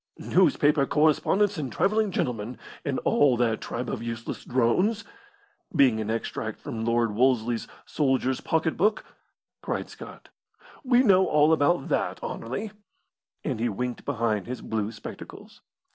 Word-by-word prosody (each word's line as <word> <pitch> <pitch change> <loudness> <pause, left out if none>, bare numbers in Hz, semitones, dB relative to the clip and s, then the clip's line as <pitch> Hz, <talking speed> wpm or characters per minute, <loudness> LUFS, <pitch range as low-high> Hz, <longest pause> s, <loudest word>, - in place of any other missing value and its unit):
"'Newspaper 145 -1 +3
correspondents 165 +6 +2
and 135 -5 -4
travelling 215 +1 +1
gentlemen, 120 - -3 0.3
and - - -1
all 135 -4 +4
that 115 -2 +1
tribe 120 +2 -4
of - - -4
useless 115 0 -5
drones' 180 - +1 0.7
being 130 -7 +4
an 110 - -4
extract 115 +1 -3
from 110 -1 -5
Lord 115 -1 +1
Wolseley's 120 -1 +1 0.2
'Soldier's 130 -3 0
Pocket 160 0 0
Book,'" 210 +3 +1 0.6
cried - - -3
Scott. - - -12 0.5
"We 250 -1 +4
know 190 -5 +5
all 150 +1 +4
about 155 0 +2
that, - - -1
Anerley;" 165 - -4 0.7
and - - -2
he 120 +1 +1
winked 125 +4 -4
behind 115 -7 -1
his 125 +1 -5
blue 110 -1 -2
spectacles. 110 - -11
130 Hz, 135 wpm, -26 LUFS, 115-160 Hz, 0.7 s, know